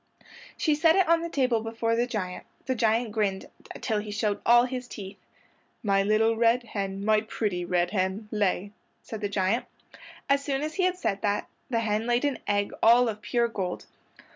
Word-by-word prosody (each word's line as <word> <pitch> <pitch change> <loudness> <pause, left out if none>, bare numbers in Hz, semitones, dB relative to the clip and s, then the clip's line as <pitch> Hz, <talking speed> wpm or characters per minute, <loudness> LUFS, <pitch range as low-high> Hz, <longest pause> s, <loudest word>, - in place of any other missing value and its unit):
She 310 - +2
set 320 +2 +4
it 380 -3 +3
on 335 0 +4
the 335 - -4
table 250 -7 +1
before 230 +1 -1
the 240 +1 +1
giant. 190 -7 -4 0.2
The 260 - 0
giant 225 -1 +1
grinned 205 -3 -1 0.4
till 215 -2 0
he 210 0 -6
showed 205 0 -1
all 240 +1 +7
his 250 -1 -5
teeth. 195 -4 -9 0.6
"My 195 -2 +3
little 215 +3 +2
red 235 +2 +3
hen, 200 -3 -4
my 215 0 +4
pretty 210 -4 -2
red 175 0 0
hen, 195 +2 -1
lay," 205 -1 0 0.3
said 220 -1 -7
the 205 - -1
giant. 195 +4 0 0.6
As 280 0 +2
soon 275 0 -1
as 310 +1 -3
he 370 0 +2
said 200 - -2
that 205 -1 -1 0.2
the 230 -3 +1
hen 215 +1 -1
laid 240 +3 +2
an 285 -3 -1
egg 205 0 +1
all 235 +2 +6
of 210 -1 -6
pure 235 +2 +1
gold. 190 -6 -4
220 Hz, 190 wpm, -27 LUFS, 205-245 Hz, 0.6 s, all